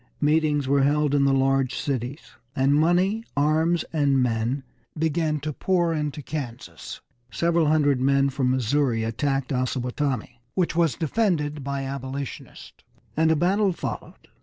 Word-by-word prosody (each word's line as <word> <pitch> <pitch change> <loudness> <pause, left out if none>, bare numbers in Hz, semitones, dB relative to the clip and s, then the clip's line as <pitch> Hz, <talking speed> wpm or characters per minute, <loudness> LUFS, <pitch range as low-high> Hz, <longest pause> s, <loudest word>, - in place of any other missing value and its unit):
Meetings 150 -2 +2
were 140 0 +3
held 145 +1 +2
in 140 -1 +3
the 140 - +3
large 135 -1 +2
cities, 135 +1 -4 0.2
and 135 +2 +3
money, 180 +8 +2
arms, 160 +4 +2
and 145 -3 +2
men 125 +2 0 0.3
began 160 -1 0
to 150 +1 -3
pour 175 +1 +1
into 150 -1 -3
Kansas. 130 -6 -7 0.3
Several 170 +2 +1
hundred 145 -4 +2
men 140 +1 +3
from 130 -1 0
Missouri 130 -1 +1
attacked 135 +4 -1
Osawatomie, 125 0 -2 0.2
which 180 -3 0
was 165 -4 +2
defended 155 -5 -1
by 140 0 -3
Abolitionists, 135 0 -7 0.3
and 160 +1 +3
a - - +4
battle 190 +4 +2
followed. - - -7
145 Hz, 135 wpm, -24 LUFS, 135-160 Hz, 0.3 s, a